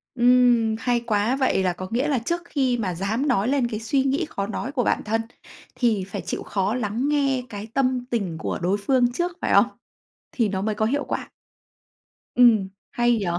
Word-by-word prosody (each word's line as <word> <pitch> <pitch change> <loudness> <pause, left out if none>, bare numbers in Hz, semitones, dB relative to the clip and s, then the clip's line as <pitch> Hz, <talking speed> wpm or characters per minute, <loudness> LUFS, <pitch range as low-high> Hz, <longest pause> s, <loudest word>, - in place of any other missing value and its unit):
Ừm, 245 -2 +4
hay 245 0 +1
quá! 225 +1 0
Vậy 260 -8 +1
là 180 -1 +1
có 185 +1 -7
nghĩa 250 +6 0
là 280 -4 +1
trước 340 +9 -2
khi 265 -6 0
mà 190 -6 -2
dám 215 - -1
nói 240 -5 +2
lên 270 -2 +1
cái 215 -3 -4
suy 265 +5 +1
nghĩ 275 +5 0
khó 200 0 -3
nói 245 +5 -4
của 255 -3 0
bản - - 0
thân, 225 +1 0 0.5
thì 225 -6 +1
phải 195 - -5
chịu - - -4
khó 195 +2 -1
lắng 240 +3 -1
nghe 275 -3 +1
cái 205 0 -7
tâm 255 -2 +1
tình 200 -10 -2
của - - -3
đối 185 +4 +1
phương 245 +3 +2
trước, 345 +7 -1
phải - - 0
không? - - +6 0.6
Thì 230 -5 0
nó 190 -1 -2
mới 215 +1 -1
có 215 - 0
hiệu 285 +5 0
quả. - - -4 1.0
Ừm, 225 -6 +5 0.2
hay 240 0 +2
nhỉ? 205 - -2
240 Hz, 205 wpm, -24 LUFS, 210-260 Hz, 1.0 s, không